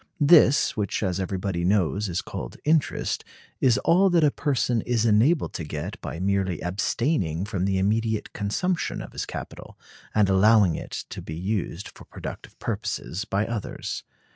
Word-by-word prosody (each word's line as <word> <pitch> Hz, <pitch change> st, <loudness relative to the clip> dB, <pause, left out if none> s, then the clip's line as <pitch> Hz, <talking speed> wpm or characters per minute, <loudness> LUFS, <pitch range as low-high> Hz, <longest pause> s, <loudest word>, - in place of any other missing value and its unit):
This, 150 Hz, -2 st, +5 dB
which 105 Hz, 0 st, -1 dB
as 90 Hz, -1 st, -1 dB
everybody 95 Hz, -1 st, -2 dB
knows 100 Hz, +1 st, +1 dB
is 85 Hz, -, -2 dB
called -, -, -7 dB
interest, 155 Hz, -2 st, +1 dB, 0.4 s
is 125 Hz, -3 st, +4 dB
all 190 Hz, +3 st, +5 dB
that 170 Hz, -3 st, +3 dB
a 150 Hz, -, +5 dB
person 125 Hz, -6 st, 0 dB
is 120 Hz, -1 st, 0 dB
enabled 115 Hz, +9 st, +3 dB
to 80 Hz, -, -4 dB
get 75 Hz, -1 st, -5 dB
by 80 Hz, -, -5 dB
merely 95 Hz, -2 st, 0 dB
abstaining 95 Hz, -, -1 dB
from 95 Hz, -4 st, -2 dB
the 95 Hz, -1 st, +1 dB
immediate 110 Hz, +3 st, 0 dB
consumption 170 Hz, -, -1 dB
of -, -, -8 dB
his -, -, -4 dB
capital, -, -, -8 dB, 0.4 s
and 105 Hz, -2 st, +4 dB
allowing 100 Hz, -1 st, +5 dB
it -, -, -5 dB
to -, -, -6 dB
be 80 Hz, -, -7 dB
used 95 Hz, +1 st, -3 dB
for -, -, -14 dB
productive -, -, -9 dB
purposes 95 Hz, +7 st, -3 dB
by 100 Hz, 0 st, 0 dB
others. 115 Hz, -2 st, -4 dB
105 Hz, 160 wpm, -25 LUFS, 95-120 Hz, 0.4 s, This